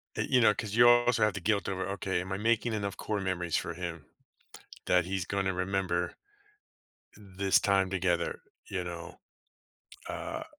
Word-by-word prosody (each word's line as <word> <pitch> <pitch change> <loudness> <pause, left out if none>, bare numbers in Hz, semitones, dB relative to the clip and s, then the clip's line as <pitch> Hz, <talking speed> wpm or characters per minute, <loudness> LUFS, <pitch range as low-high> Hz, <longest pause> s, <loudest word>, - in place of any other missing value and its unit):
Y - - -1
you 125 -2 +4
know, 110 -2 +6
'cause 105 -1 -5
you 120 +1 +7
also 120 -1 +5
have 105 -1 +3
the 105 - -4
guilt 100 +2 +1
over, 95 -1 -2
"Okay, 95 -2 -2
am 95 +1 -7
I 95 - -1
making 115 +2 +1
enough 100 -3 -3
core 105 -1 -2
memories 90 -3 -2
for 85 - -3
him 85 -3 -6 0.8
that 90 -2 +3
he's 95 -1 -2
gonna 95 0 -1
remember 90 -1 -1 1.0
this 100 -1 +1
time 95 -2 +2
together," 95 -2 -1 0.3
you 90 -2 -3
know? 85 -1 -8 0.9
Uh, - - -5
95 Hz, 165 wpm, -30 LUFS, 90-105 Hz, 1.0 s, you